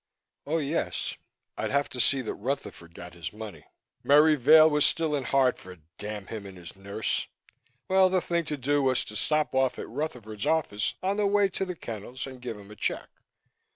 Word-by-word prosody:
Oh, 160 +3 +1
yes, 150 +1 -2 0.4
I'd - - -1
have 140 0 +1
to 125 - -8
see 135 +2 +4
that 115 - -4
Rutherford 100 -8 -5
got 90 -1 -10
his 85 -3 -6
money. 105 -8 -9 0.4
Merry 150 +2 +6
Vail 155 +4 +7
was 150 -2 +3
still 160 -2 +3
in 140 -3 -1
Hartford, 115 - 0 0.2
damn 105 -1 -5
him 105 -2 -7
and 95 -1 -11
his 85 0 -11
nurse! 100 +2 -2 0.6
Well, 190 0 +5
the 185 0 +2
thing 170 -1 -1
to 150 -1 -3
do 145 +2 +1
was 130 -2 +2
to 105 - -8
stop 150 +5 +1
off 130 -1 +1
at - - -6
Rutherford's 115 -6 -4
office 150 -10 0
on 195 +2 0
the 210 -1 +2
way 200 0 +3
to 190 - -2
the 180 -1 -5
kennels 120 -1 -7
and 130 -2 -10
give 120 -3 -5
him 100 0 -13
a - - -10
check. - - -2
130 Hz, 195 wpm, -27 LUFS, 105-155 Hz, 0.6 s, Vail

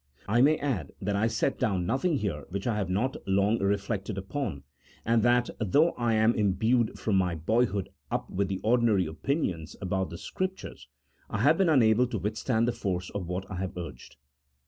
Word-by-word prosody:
I 115 +4 +3
may 150 +4 +5
add 110 - -3
that 100 +1 -1
I 105 +3 +2
set 115 -1 -1
down 95 -4 0
nothing 140 - +1
here 85 - -3
which 100 +2 -4
I 120 - +1
have 100 -3 -2
not 110 +8 0
long 100 +3 +2
reflected 100 0 -1
upon, 95 - -4 0.4
and 115 0 +3
that, 120 +1 +3
though 145 - +3
I 115 -2 +1
was 115 - +4
imbued 110 +4 +1
from 105 -3 0
my 90 -2 +1
boyhood 100 +3 0 0.2
up - - -2
with 100 +1 -1
the 95 0 -2
ordinary 110 -4 +3
opinions 80 - -2
about 95 -1 -1
the 85 - -7
Scriptures, 185 - -5 0.4
I 100 - -2
have 155 +5 +4
been 190 -3 +4
unable 125 -4 +4
to 120 - -3
withstand 110 +4 0
the - - +2
force 95 -6 -3
of 100 -4 -4
what 90 +2 -3
I 95 - -4
have 95 0 -4
urged. 75 -8 -8
105 Hz, 190 wpm, -28 LUFS, 95-120 Hz, 0.4 s, may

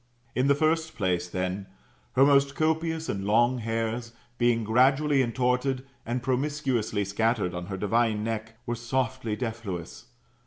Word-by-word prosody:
In 130 +2 +2
the 140 - +5
first 160 +2 +1
place, 90 -3 0
then, 95 +2 -3 0.5
her 130 +2 +6
most 140 -1 +4
copious 160 +1 0
and 100 -1 -2
long 120 +5 +3
hairs, 115 +1 -2 0.3
being 120 -1 +3
gradually 135 +5 +3
intortcd, 125 +2 0 0.2
and 120 +1 -2
promiscuously 130 -6 0
scattered 105 -1 0
on 90 0 -5
her 95 -1 -4
divine 110 +1 +1
neck, 110 0 -4
were 120 - -2
softly 120 -1 -2
defluous. 100 - -5
120 Hz, 140 wpm, -27 LUFS, 105-135 Hz, 0.5 s, her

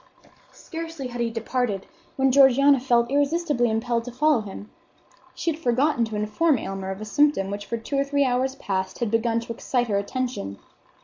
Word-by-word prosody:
Scarcely 325 -5 -7
had 245 0 -5
he 235 - +1
departed 225 -3 -2 0.3
when 270 -1 +2
Georgiana 275 +1 +6
felt 240 -1 +2
irresistibly 285 -3 +1
impelled 230 +1 0
to 245 - -6
follow 290 0 +2
him. 205 0 -9 0.6
She 335 - -1
had 315 - -7
forgotten 255 -2 +2
to 220 -1 -6
inform 215 +9 +1
Aylmer 195 -2 -5
of 190 +2 -5
a - - -5
symptom 250 -5 +2
which 205 0 -5
for 235 - -2
two 250 +5 -4
or - - +3
three 280 0 +1
hours 260 +1 0
past 190 -5 -3
had 235 -4 -2
begun 230 0 +1
to 230 0 -6
excite 245 +1 -1
her 200 -1 +2
attention. 220 - -4
245 Hz, 185 wpm, -24 LUFS, 220-275 Hz, 0.6 s, Georgiana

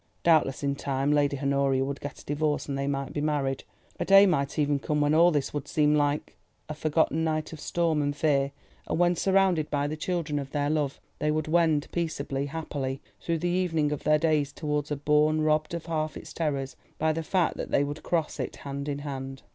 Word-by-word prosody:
Doubtless 155 -5 +3
in 140 0 +1
time 140 0 -1
Lady 145 -1 +2
Honoria 140 -1 +1
would 140 0 -5
get 145 - -6
a - - -19
divorce, 150 +1 0
and 140 - -2
they 140 0 -2
might 140 -1 -2
be 145 - -2
married. 140 -3 -1 0.4
A - - +1
day 195 +1 +7
might 140 -7 0
even 145 -1 +2
come 150 +2 -1
when 145 0 +2
all 170 +2 +6
this 145 -5 -1
would 145 -1 -4
seem 150 0 +2
like 145 0 0 0.3
a 155 - -4
forgotten 155 +1 +1
night 155 0 -1
of 155 - -8
storm 165 -2 0
and 145 0 -1
fear; 140 -2 +1 0.4
when, 175 +1 +2
surrounded 190 -4 +2
by 145 -1 0
the 150 +2 -2
children 155 -2 -2
of 135 -1 -6
their 145 0 0
love, 150 -3 -1 0.2
they 150 - 0
would 155 0 0
wend 160 -2 +2
peaceably, 145 -5 -2
happily, 140 -3 -4 0.2
through 165 -1 -1
the 175 +2 -1
evening 165 -5 +1
of 150 - -3
their 150 0 +4
days 150 -2 +1
towards 150 -1 -2
a 150 - -1
bourne 150 +2 +2
robbed 155 +1 +1
of 170 - -6
half 155 -2 -2
its - - -10
terrors 140 -5 -2 0.2
by 160 0 +1
the 165 - -2
fact 175 +2 +1
that - - -4
they 140 - +3
would 145 +2 -4
cross 165 -3 -1
it - - -3
hand 140 +1 -5
in 140 - -2
hand. 135 -1 -6
150 Hz, 215 wpm, -27 LUFS, 140-160 Hz, 0.4 s, day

